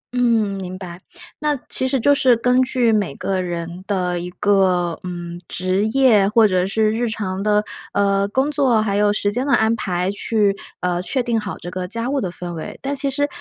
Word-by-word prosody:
嗯， 225 -5 +2
明 185 0 -6
白。 180 -2 -8 0.4
那 300 -1 +1
其 260 - 0
实 265 -1 0
就 285 +5 +4
是 255 -3 +4
根 250 +2 +3
据 250 -3 +2
每 200 -10 0
个 190 -1 -2
人 175 +1 -5
的 180 -3 -1
一 175 +1 -5
个， 185 -4 +2
嗯， 175 -1 -6
职 185 +3 0
业， 220 -5 +4
或 220 0 +5
者 185 -1 +1
是 215 +1 +1
日 230 +1 -1
常 195 -3 -3
的， 210 0 +2 0.3
呃， 200 0 +2
工 265 +7 0
作， 265 -7 +3
还 205 -2 0
有 205 0 +3
时 205 -1 0
间 250 +5 -2
的 - - +2
安 220 +1 +3
排， 185 -3 -1
去， 205 -1 +1 0.3
呃， 180 0 0
确 255 +7 -1
定 235 -2 0
好 205 -2 -5
这 175 - -7
个 180 0 -4
家 230 +6 -3
务 280 - 0
的 185 - -2
氛 175 0 -6
围。 160 - -7
但 280 +1 -2
其 275 0 -1
实 285 +1 0
205 Hz, 225 characters per minute, -20 LUFS, 185-240 Hz, 0.4 s, 或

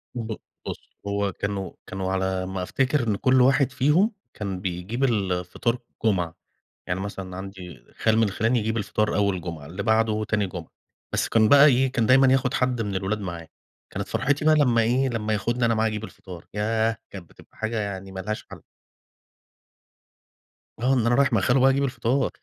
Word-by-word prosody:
ب 115 -2 -3 0.3
بُص - - -8
هو 100 0 0
كانوا 100 -1 -3 0.2
كانوا 95 0 -3
على 95 -1 -1
ما 95 0 -4
افتكَر 130 +5 0
إن 105 - +2
كل 130 +5 +3
واحد 130 +1 +4
فيهم 150 - +3 0.2
كان 100 -4 -4
بيجِيب 95 +7 -3
الفطار 105 0 0 0.3
الجمعة. 90 -6 +1 0.5
يعني 90 0 -2
مثلًا 95 -2 -6
عندي 95 -2 -9
خال 110 0 +3
من 110 -3 +3
خِلَاني 115 +5 +1
يجِيب 110 +1 -1
الفطار 105 0 0
أول 100 -3 +1
جمعة، 85 -4 -7
اللي 90 +6 -5
بعده 110 -1 +2
تاني 105 -1 0
جمعة. 90 -3 -8 0.4
بس - - 0
كان 110 -1 +4
بقى 145 +3 +8
إيه، 130 -2 +3
كان 115 -4 +1
دايمًا 130 +1 +6
ياخُد 130 0 +1
حد 125 -4 +1
من 100 -2 -3
الولاد 95 +3 -2
معاه. 85 -4 -6 0.4
كانت 100 0 -5
فَرحتي 145 +6 0
بقى 155 - +6
لما 125 -6 +4
إيه، 125 +4 +2
لما 110 -3 -2
ياخُدني 120 +4 0
أنا 115 0 +3
معاه 110 0 +1
أجِيب 110 0 -4
الفطار 90 -5 -10
ياه، 110 +1 +1
كانت 95 -4 -10
بتبقى - - -19
حاجة 110 +1 -3
يعني 95 -2 -5
ما 95 - -5
لهاش 105 +3 -4
حل. - - -10 2.2
آه، 125 +3 +2
إن 125 -4 +2
أنا 120 +1 +3
رايِح 140 -1 +3
مع 110 - +3
خالو 125 +7 +3
بقى 130 +1 +6
أجِيب 135 +1 +2
الفطار. 130 0 0
110 Hz, 185 wpm, -25 LUFS, 95-125 Hz, 2.2 s, بقى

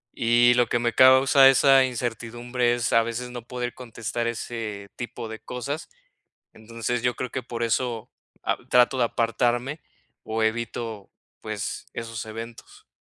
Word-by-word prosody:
Y 120 0 +4
lo 120 0 +3
que 120 - 0
me 120 -1 0
causa 130 +2 +7
esa 135 0 +6
incertidumbre 120 0 -2
es 120 -2 -1
a 115 - +5
veces 120 +2 -5
no 120 -1 -6
poder 125 -1 -4
contestar 115 -1 -4
ese 110 -3 -5
tipo 120 -1 -6
de 110 0 -7
cosas, 135 +5 -5 0.6
entonces 115 +2 -4
yo 125 -1 +1
creo 125 - -4
que 130 - -4
por 120 -1 -4
eso, 115 0 -1 0.3
ah, - - 0
trato 125 +1 +4
de 125 - +3
apartarme 120 +5 0 0.4
o 110 +1 -3
evito, 110 -2 -3 0.3
pues, 110 -2 -5
esos 115 -1 -5
eventos. 115 +1 -10
120 Hz, 150 wpm, -25 LUFS, 115-125 Hz, 0.6 s, causa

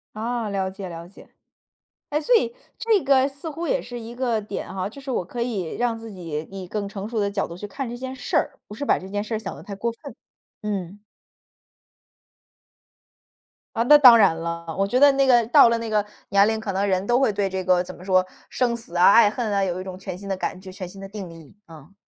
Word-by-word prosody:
啊， 230 0 -2
了 195 -1 -1
解 190 0 -8
了 170 0 -8
解。 195 - -16 0.8
哎， 300 - 0
所 315 +11 +2
以， 460 +1 0 0.2
这 445 -5 +2
个 270 -1 +4
似 280 +3 -7
乎 330 +3 -5
也 - - +1
是 245 -1 -8
一 230 +1 -8
个 240 -2 0
点 205 -2 -6
哈， 185 0 -2
就 225 +7 -8
是 270 -1 -7
我 185 - -1
可 240 +6 -7
以 210 -9 -3
让 240 -2 0
自 225 -2 -9
己 160 -4 -5
以 190 -1 -7
更 205 +1 -3
成 200 0 -6
熟 230 -1 -3
的 200 -1 +1
角 200 -1 -2
度 170 - -8
去 205 - -7
看 260 +5 -5
这 240 - -6
件 260 +1 -6
事 250 -2 -3
儿， 280 - 0
不 210 - -8
是 285 - -4
把 - - +3
这 190 - -10
件 205 +1 -3
事 220 - -4
儿 - - 0
想 220 - -6
得 - - -11
太 200 - -7
过 235 +4 -2
分， 275 +5 -11 0.5
嗯。 200 -2 -4 2.8
啊， 225 - +1
那 295 +5 +8
当 250 -5 +9
然 195 -7 +5
了， 170 0 -5
我 195 - +2
觉 250 +4 +1
得 285 0 +8
那 275 0 +3
个 240 -3 +5
到 235 - +7
了 235 - +1
那 230 -1 -4
个 210 -1 +2 0.3
年 200 +1 +5
龄， 220 0 0
可 210 -3 -4
能 200 +2 0
人 190 0 0
都 240 +1 +3
会 265 -6 +2
对 195 -1 0
这 190 0 -3
个， 180 -1 +3
怎 - - -9
么 180 - -13
说？ 185 -1 +3 0.2
生 240 -2 0
死 225 -7 -12
啊， 175 +3 +7
爱 225 -2 +7
恨 225 -1 -3
啊， 200 -1 +1
有 185 -1 -2
一 - - -6
种 185 -1 -7
全 185 -1 -6
新 195 +2 -9
的 195 - -1
感 185 - -3
觉 185 0 -10
全 185 -1 -7
新 195 +2 -12
的 195 - -7
定 200 -3 -7
义， 165 -2 -14
嗯。 160 +2 -14
205 Hz, 270 characters per minute, -23 LUFS, 190-240 Hz, 2.8 s, 当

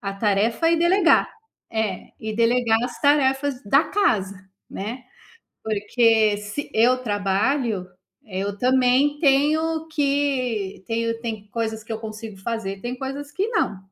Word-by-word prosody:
a 195 -1 -4
tarefa 215 +10 +1
e 335 - +3
delegar. 345 +1 +4 0.4
É, 220 -4 -2
e 220 -1 -5
delegar 230 0 +3
as 245 0 -5
tarefas 280 -2 +2
da 275 +9 +3
casa, 210 - +1 0.3
né, 235 +6 -6 0.6
porque 220 0 +2
se 210 +8 -6
eu 245 +3 +4
trabalho, 205 0 0 0.4
eh, 190 -3 -5
eu 200 0 -3
também 260 +3 +3
tenho 315 +3 +2
que 275 -10 -1
tenho 230 0 -1
tem 220 -3 -5
coisas 220 -1 -3
que 225 - -7
eu 220 - -4
consigo 215 -1 -8
fazer, 195 -2 -4
tem 245 +1 -4
coisas 275 +2 -6
que 380 +7 -1
não. 415 - 0
230 Hz, 140 wpm, -23 LUFS, 210-280 Hz, 0.6 s, delegar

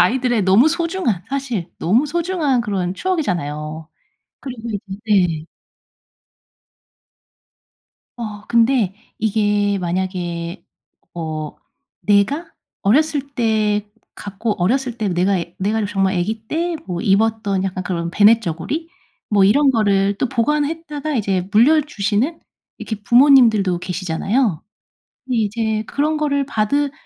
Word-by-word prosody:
아이들의 245 +3 +2
너무 195 +10 +5
소중한, 335 - -1
사실 255 -10 -3
너무 230 - +2
소중한 330 -5 0
그런 190 -5 -2
추억이잖아요. 160 - -3 0.5
그리고 240 -4 -7
이제 205 - -2 0.3
네. 180 -7 +2 2.7
어. 210 -3 -7
근데 230 -4 +2 0.2
이게 205 -2 +1
만약에 175 -1 -3 0.5
어 155 -2 -5 0.4
내가 210 - +1 0.3
어렸을 285 +6 +2
때 215 -3 +1 0.3
갖고 205 +2 -3
어렸을 245 +4 0
때 215 -3 -1
내가 185 +2 +1 0.2
내가 210 +3 0
정말 195 -1 0
애기 215 +5 -2
때 335 +4 -1
뭐 175 -1 -3
입었던 200 -1 +1
약간 185 -1 -3
그런 170 -2 -3
배냇저고리 210 - +2 0.4
뭐 205 -2 +4
이런 270 +9 +5
거를 200 -4 +2
또 260 - 0
보관했다가 300 +3 -1
이제 190 -4 -1
물려주시는 255 - +2 0.4
이렇게 215 -2 -6
부모님들도 235 -8 +5
계시잖아요. 180 - -1 0.6
근데 255 -2 -2
이제 220 0 -1
그런 300 +6 0
거를 285 -2 0
받으 280 +6 0
215 Hz, 255 characters per minute, -19 LUFS, 190-270 Hz, 2.7 s, 너무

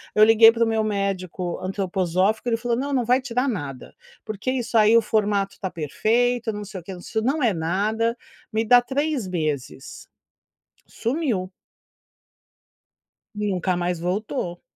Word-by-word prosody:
Eu 215 - +6
liguei 225 0 +8
para 230 0 +1
o - - -1
meu 220 -1 +1
médico 195 -4 -2
antroposófico 190 +3 0
ele 230 - +1
falou 240 0 -1
não, 280 +3 -2
não 250 -3 +1
vai 250 +3 +3
tirar 255 0 -1
nada 145 - -6 0.3
porque 215 +4 -3
isso 245 -3 -1
aí 220 +1 +6
o - - +5
formato 205 -2 0
está 190 - -5
perfeito 230 - 0
não 205 0 -6
sei 195 -2 -8
o - - -22
que 190 - -7 0.3
não 280 +6 0
é 225 -5 +3
nada, 210 +8 0 0.4
me 220 +1 +1
dá 245 +2 +6
3 280 -2 -2
meses. 150 -6 -4 0.8
Sumiu. 235 - -2 1.9
Nunca 190 -3 -1
mais 175 0 -1
voltou. 180 +1 -3
215 Hz, 145 wpm, -23 LUFS, 185-235 Hz, 1.9 s, liguei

